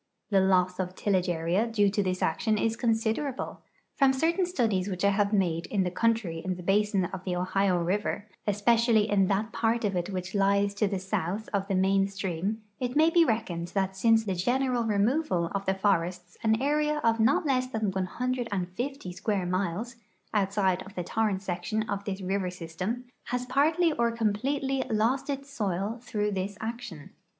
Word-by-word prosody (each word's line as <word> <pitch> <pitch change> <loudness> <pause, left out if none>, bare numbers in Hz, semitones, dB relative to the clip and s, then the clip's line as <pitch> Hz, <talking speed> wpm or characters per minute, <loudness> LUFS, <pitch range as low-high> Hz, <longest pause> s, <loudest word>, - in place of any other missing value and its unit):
The 195 - +5
loss 185 -1 +2
of 185 0 -3
tillage 185 -3 +1
area 175 +6 +1
due 205 -3 +2
to 205 - +1
this 185 -1 -1
action 215 +7 +1
is 225 +1 +1
considerable; 230 +4 -1 0.3
from 270 -2 +4
certain 335 +6 +1
studies 220 - 0
which 185 0 -1
I 200 - +5
have 200 0 +1
made 175 -5 +1
in 200 -3 +1
the 180 - -2
countiy 210 -6 0
in 185 0 -2
the 180 - -9
basin 200 0 +2
of 185 +1 -6
the 180 -2 -2
Ohio 185 +1 +1
river, 200 +4 -1 0.2
especially 220 +1 +3
in 195 -3 +3
that 210 +3 0
part 230 0 0
of 200 -2 0
it 175 +1 -1
which 185 -1 -4
lies 200 0 +2
to 205 +1 +1
the 195 0 -1
south 190 +2 -3
of 195 -1 0
the 195 - 0
main 195 +1 +3
stream, 195 +2 -3 0.2
it 250 0 -2
ma}' 315 +2 +5
be 340 0 +6
reckoned 215 - -1
that 190 -1 0
since 225 +3 +4
the 195 - -1
general 245 +6 +1
removal 210 - +1
of 200 -1 -3
the 190 - +2
forests 180 -2 0
an 220 0 +2
area 300 +2 +1
of 230 0 +3
not 250 +8 +3
less 255 -3 +1
than 220 -5 -1
150 230 +2 -3
square 195 +1 -1
miles, 190 +6 -2 0.4
outside 195 -2 +1
of 195 +2 -11
the 180 - -2
torrent 205 0 0
section 195 +4 -2
of 200 -1 -3
this 195 -1 -4
river 190 0 -1
system, 180 +8 -5 0.2
has 250 0 -2
parti 315 +6 +3
j' - - -3
or 235 0 +3
completel}^ 260 +5 0
lost 230 +7 +1
its 275 0 -4
soil 205 -1 -2
through 210 -3 -1
this 195 +1 -3
action. 220 -9 -6
205 Hz, 185 wpm, -28 LUFS, 185-235 Hz, 0.4 s, be